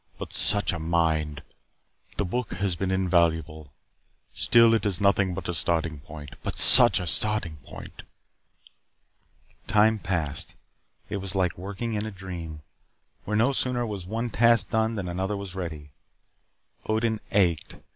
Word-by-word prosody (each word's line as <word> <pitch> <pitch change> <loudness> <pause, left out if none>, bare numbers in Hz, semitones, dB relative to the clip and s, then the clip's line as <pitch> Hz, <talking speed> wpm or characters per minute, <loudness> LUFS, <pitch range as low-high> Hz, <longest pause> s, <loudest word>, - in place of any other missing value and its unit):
But - - -8
such 105 -2 +2
a 85 - -5
mind! 80 -2 -1 0.7
The 100 - -1
book 120 +5 -4
has 100 -3 -2
been 95 +2 -3
invaluable. 85 -5 0 0.6
Still, 115 -1 +4
it 115 - +1
is 100 -4 -1
nothing 100 -2 +1
but 95 - -6
a 90 - -2
starting 80 -1 -1
point 75 0 -11
but - - -5
such - - +8
a 90 - -5
starting 95 -2 +1
point!" 70 - -12 1.7
Time 110 +1 +3
passed. 80 -7 -3 0.5
It 100 - -4
was 95 -1 -4
like 90 -3 0
working 100 +5 -6
in 105 0 -3
a - - -6
dream, 85 -5 -9 0.6
where 105 +1 -1
no 120 +5 +2
sooner 125 -2 -1
was 100 -5 -6
one 115 +3 -4
task 115 -3 +3
done 110 0 0
than 100 -4 -4
another 95 +3 -3
was 100 -3 -8
ready. 80 -6 -7 1.0
Odin 110 0 -1
ached. 85 -6 0
95 Hz, 145 wpm, -25 LUFS, 85-105 Hz, 1.7 s, such